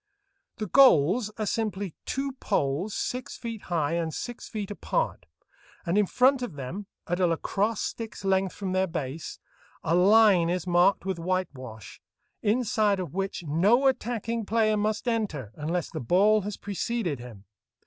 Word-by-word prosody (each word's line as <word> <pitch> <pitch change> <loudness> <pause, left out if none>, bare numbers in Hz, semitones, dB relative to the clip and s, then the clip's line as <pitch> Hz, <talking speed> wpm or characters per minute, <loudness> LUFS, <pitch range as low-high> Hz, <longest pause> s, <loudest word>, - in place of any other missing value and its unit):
The 215 - -4
goals 210 - +5
are 215 - -1
simply 205 -4 -2
two 275 +1 -2
poles 145 +9 -1
six 250 0 -3
feet 230 -3 -6
high 165 -3 0
and 165 -1 -1
six 240 - -6
feet 210 -3 -5
apart, - - -2 0.6
and 170 +1 0
in 210 -1 +3
front 260 +4 +3
of 240 -11 -5
them, 155 +10 -6 0.2
at 175 +1 -2
a 180 - +4
lacrosse 200 +6 0
stick's 225 -3 -5
length 190 -1 +1
from 195 -2 -4
their 185 0 +1
base, 155 -2 -5 0.5
a 165 - 0
line 190 -1 +5
is 180 0 -1
marked 175 +1 +3
with 190 -3 -2
whitewash, 150 - -4 0.4
inside 215 -2 +2
of 180 -3 -5
which 195 -1 -3
no 190 - +3
attacking 235 -3 0
player 215 0 +2
must 215 +3 -1
enter 195 - -1
unless 165 +5 -3
the - - -4
ball 200 - +4
has 205 +1 -5
preceded 200 - -2
him. 115 -5 -11
195 Hz, 155 wpm, -27 LUFS, 170-220 Hz, 0.6 s, goals